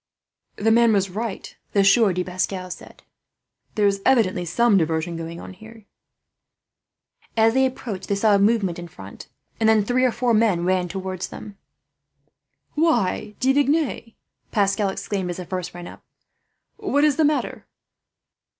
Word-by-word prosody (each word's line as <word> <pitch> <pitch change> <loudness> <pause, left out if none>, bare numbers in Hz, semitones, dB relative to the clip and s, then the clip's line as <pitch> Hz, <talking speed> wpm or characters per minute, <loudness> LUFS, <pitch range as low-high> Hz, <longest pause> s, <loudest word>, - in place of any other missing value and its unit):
"The 225 +2 +1
man 230 0 +5
was 195 -2 +1
right," 215 +1 -5 0.2
the 200 - +4
Sieur 200 +1 +5
de 180 0 -1
Pascal 185 0 -3
said. - - -11 0.7
"There 210 - +2
is 200 -1 +1
evidently 205 -9 +2
some 230 +6 +2
diversion 165 -1 0
going 165 +1 -6
on - - -9
here." 220 +2 -15 1.5
As 225 0 +4
they 265 +1 +3
approached 235 -6 -7
they 200 - 0
saw 210 +1 +3
a 200 - +4
movement 200 -4 +1
in 175 - -7
front, 100 - -12 0.3
and 220 -1 +3
then 215 -2 +3
three 250 +3 +1
or 255 - +3
four 240 0 0
men 210 -6 +2
ran 185 -1 +1
towards 190 0 -5
them. 205 -2 -10 1.2
"Why, 300 - 0
De 265 +1 +3
Vignes," 285 +1 +3 0.3
De 230 - -23 0.4
Pascal 200 0 +1
exclaimed, 190 -1 -4
as 175 - -4
the 180 - -6
first 180 -1 -5
ran 175 0 -8
up, - - -13 0.7
"what 375 -9 0
is 300 -2 +3
the 320 - +3
matter?" 300 0 -1
200 Hz, 160 wpm, -22 LUFS, 185-230 Hz, 1.5 s, man